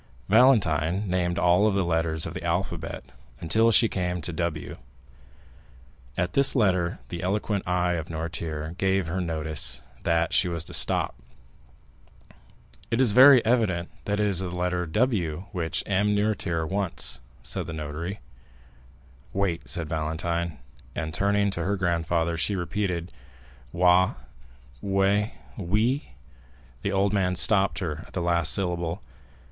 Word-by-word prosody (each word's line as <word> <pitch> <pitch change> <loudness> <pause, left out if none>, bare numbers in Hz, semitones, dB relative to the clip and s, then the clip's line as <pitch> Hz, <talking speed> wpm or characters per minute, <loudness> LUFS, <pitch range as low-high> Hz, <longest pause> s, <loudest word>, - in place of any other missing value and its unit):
Valentine 100 - +3
named 90 -1 0
all 90 +5 +4
the 100 -2 0
letters 80 -1 0
of - - -5
the - - -6
alphabet 85 -1 -3 0.4
until 110 +8 +2
she 115 +1 +6
came 90 -3 -2
to 85 +1 -5
W. 85 -2 -3 1.4
At 90 0 -1
this 140 0 +4
letter 90 -7 +1
the 85 +2 -5
eloquent 100 +1 -1
eye 90 0 +1
of 80 -2 -3
Noirtier 80 -1 -4
gave 95 -1 +1
her 90 +4 -2
notice 80 -7 0 0.2
that 85 0 +1
she 95 - +4
was 85 -2 -3
to - - -8
stop. - - +3 1.8
"It 115 - 0
is 130 -5 +5
very 130 +2 +8
evident 105 -8 +1
that 105 0 -1
it 105 - +2
is 100 -4 0
the 95 -1 -2
letter 90 0 -2
W 90 -5 0
which 85 -5 -2
M. 105 +1 +1
Noirtier 100 -6 0
wants," 95 -9 -2 0.2
said 60 -1 -4
the - - -5
notary. 80 +5 -5 1.1
"Wait," 95 -4 -2
said 85 -2 -2
Valentine; 80 +2 -2 0.4
and, 80 -1 -4
turning 100 +2 +1
to 85 -3 -3
her 100 +4 0
grandfather, 85 -2 0
she 100 +5 0
repeated, 90 -1 -2 0.6
"Wa—We—Wi——" 90 - -1 0.7
The 100 - -2
old 100 +1 +1
man 90 -2 +1
stopped 100 +1 +3
her 80 -4 -4
at - - -19
the 90 - -2
last 85 -1 +3
syllable. 85 -3 -1
90 Hz, 135 wpm, -26 LUFS, 80-100 Hz, 1.8 s, very